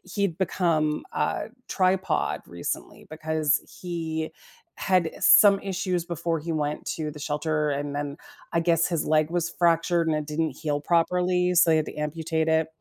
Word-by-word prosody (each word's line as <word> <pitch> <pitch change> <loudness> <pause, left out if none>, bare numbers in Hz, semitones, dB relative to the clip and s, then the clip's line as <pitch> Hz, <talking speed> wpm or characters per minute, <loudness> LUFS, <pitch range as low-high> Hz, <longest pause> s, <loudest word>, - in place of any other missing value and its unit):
he'd 200 -5 0
become 165 -5 0
a - - -1 0.2
tripod 190 0 +1
recently 85 0 -5
because 155 -1 0 0.2
he 160 -3 -3 0.4
had, 185 -3 +2
eh, - - -9
some 200 -2 +7
issues 185 -2 -2
before 170 -1 -2
he 165 +2 -5
went 150 -1 -2
to 155 -2 -3
the 150 - -11
shelter, 150 +1 -1
and 145 0 -3
then 145 -1 -4 0.4
I 170 - +3
guess 165 -1 +2
his 170 -4 -1
leg 155 0 +2
was 175 -1 0
fractured 170 0 +2
and 155 - +2
it 150 - -4
didn't 155 0 -1
heal 145 -2 -2
properly, 180 +2 +2
so 170 -1 +6
he 160 - +5
had 155 - 0
to - - -6
amputate 160 +1 -2
it, 160 0 +2
160 Hz, 170 wpm, -26 LUFS, 150-175 Hz, 0.4 s, some